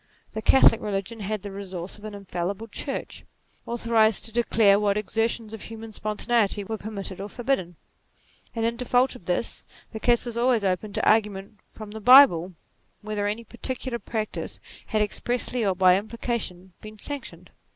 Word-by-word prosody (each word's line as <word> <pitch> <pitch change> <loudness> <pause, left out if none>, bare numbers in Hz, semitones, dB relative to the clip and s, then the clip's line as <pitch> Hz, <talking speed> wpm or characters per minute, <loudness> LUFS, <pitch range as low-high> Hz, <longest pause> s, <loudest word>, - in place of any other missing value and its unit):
The 220 - -4
Catholic 225 -1 +6
religion 205 +2 -3
had 210 0 -3
the 200 - -6
resource 190 -1 -6
of 210 - -11
an 215 -1 -6
infallible 195 +2 -4
Church, 270 +5 -5 0.4
authorized 230 -2 +2
to 225 - -5
declare 215 -3 +4
what 205 -1 +1
exertions 225 +1 -1
of 220 - -7
human 225 0 -8
spontaneity 215 0 0
were 220 +2 -5
permitted 200 -3 -6
or 200 - -6
forbidden; 230 -8 -2 0.8
and 225 -1 0
in 235 0 -1
default 250 +1 +2
of 200 - -13
this, 180 +6 -1 0.3
the 220 - -6
case 240 +1 +2
was 235 -1 -5
always 240 -3 +3
open 195 +2 -1
to - - -1
argu 215 -1 +4
ment 200 +2 -10
from 215 -1 -9
the 220 +1 -7
Bible 205 -8 +7 0.5
whether 210 -1 -2
any 215 +3 -3
particular 240 +2 -4
practice 215 0 -4 0.3
had 215 -1 +1
expressly 240 +3 -2
or 195 -3 +1
by 180 0 +6
implication 200 -4 -4
been 215 0 -10
sanctioned. 285 +5 -7
215 Hz, 165 wpm, -25 LUFS, 200-235 Hz, 0.8 s, Bible